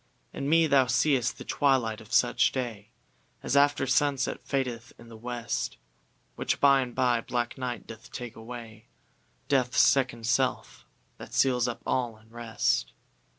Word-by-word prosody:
In 140 - -3
me 165 +1 +5
thou 140 -4 +4
seeŌĆÖst 125 0 +1
the - - -10
twilight 125 -6 +1
of 110 - -16
such - - +3
day 115 -5 -5 0.5
As - - -1
after 145 -1 +4
sunset 135 0 +1
fadeth 125 -4 -3
in 120 - -15
the 115 - -11
west; 120 +1 -4 0.6
Which - - -1
by 140 -1 +5
and 125 -2 -5
by 125 -2 +2
black 120 0 -2
night 125 -2 -5
doth 110 0 -12
take 120 -2 -7
away, 115 -1 -10 0.6
DeathŌĆÖs 130 -3 +1
second 125 -4 +3
self, 125 +3 -1 0.3
that - - -9
seals 125 -2 +3
up 120 - -5
all 120 -4 -1
in 110 +1 -23
rest. 115 -1 -1
125 Hz, 150 wpm, -28 LUFS, 115-135 Hz, 0.6 s, me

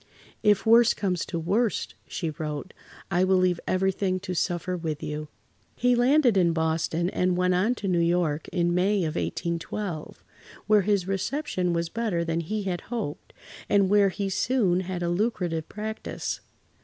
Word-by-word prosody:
"If 210 +1 +3
worse 230 +1 +6
comes 185 -4 -1
to 170 - -3
worst," 200 +8 0
she 165 -4 -3
wrote, 150 +3 -5 0.4
"I 180 0 +3
will 190 0 +4
leave 180 -2 +2
everything 185 0 +1
to 190 -2 -4
suffer 180 +1 -1
with 160 -3 -4
you." 150 0 -4 0.5
He 250 0 +3
landed 245 -2 +4
in 170 -3 +3
Boston 160 +1 0
and 180 -1 +1
went 180 0 +2
on 205 +7 +2
to 205 - -5
New 180 -2 +2
York 170 -3 +1
in 175 -1 0
May 190 +2 +2
of 155 -2 -1
1812, 170 0 -4 0.4
where 210 -1 +5
his 200 -2 +1
reception 195 -1 -1
was 170 0 -1
better 210 -7 -1
than 165 0 -1
he 210 +6 -3
had 180 -2 -2
hoped, 220 -11 -4 0.4
and 200 -2 +3
where 205 -1 +5
he 195 +1 -3
soon 195 -2 +1
had 185 -1 -4
a 170 - 0
lucrative 175 -4 -1
practice. 215 +1 -5
185 Hz, 165 wpm, -26 LUFS, 170-205 Hz, 0.5 s, worse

